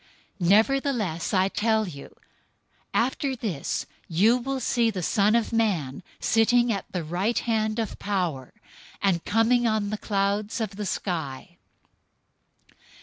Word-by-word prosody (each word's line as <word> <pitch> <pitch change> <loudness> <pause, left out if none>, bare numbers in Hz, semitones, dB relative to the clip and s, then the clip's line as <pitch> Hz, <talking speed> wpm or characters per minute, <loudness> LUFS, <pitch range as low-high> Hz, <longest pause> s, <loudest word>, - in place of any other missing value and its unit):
Nevertheless, 215 - +2
I 190 -1 +3
tell 220 +1 +1
you, 140 -5 -10 0.8
after 265 +3 0
this 205 - -3 0.2
you 200 +8 +4
will 265 +2 -2
see 235 -1 +2
the 190 -5 -4
Son 210 +5 +3
of 235 0 0
Man 185 - 0 0.2
sitting 240 +1 +3
at 195 - -6
the 180 -3 -3
right 180 +9 -1
hand 220 -2 0
of 225 -3 -3
Power, 175 -10 -2 0.5
and 185 -4 +1
coming 235 +2 +3
on 215 -2 0
the 215 - -3
clouds 205 +2 -1
of 220 -3 -2
the 205 0 -4
sky." 175 -3 -4
210 Hz, 130 wpm, -26 LUFS, 180-230 Hz, 0.8 s, you